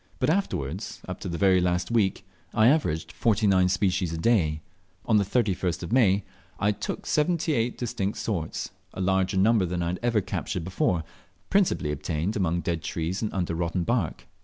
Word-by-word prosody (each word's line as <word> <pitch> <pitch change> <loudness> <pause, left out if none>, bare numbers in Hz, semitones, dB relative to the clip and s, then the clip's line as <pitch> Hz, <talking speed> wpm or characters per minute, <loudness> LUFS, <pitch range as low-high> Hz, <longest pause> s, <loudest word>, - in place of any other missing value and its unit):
But - - +2
afterwards, 95 - -2
up 90 0 -5
to 95 - -5
the 85 - -3
very 95 -1 +4
last 90 +4 0
week, 100 -4 +1 0.3
I 110 +2 +6
averaged 80 - +1
49 100 -1 +3
species 95 -3 +1
a 80 - -3
day. 80 -6 +2 0.4
On 110 - +4
the 100 - +4
31st 95 -5 0
of 85 - -6
May, 105 -6 +4 0.4
I 100 +2 +3
took 100 - -5
78 150 -7 +1
distinct 105 -4 -2
sorts, 85 -8 -3 0.2
a - - -6
larger 95 0 +1
number 100 -1 +4
than 90 0 -2
I 85 - -1
had 90 - -3
ever 120 -2 +2
captured 90 -1 -3
before, 90 -1 0 0.5
principally 185 - +2
obtained 75 +6 -2
among 85 -3 0
dead 85 -2 -2
trees 85 +3 -3
and 110 - -1
under 90 -3 -1
rotten 85 +1 -1
bark. 115 -5 -1
95 Hz, 175 wpm, -26 LUFS, 85-110 Hz, 0.5 s, I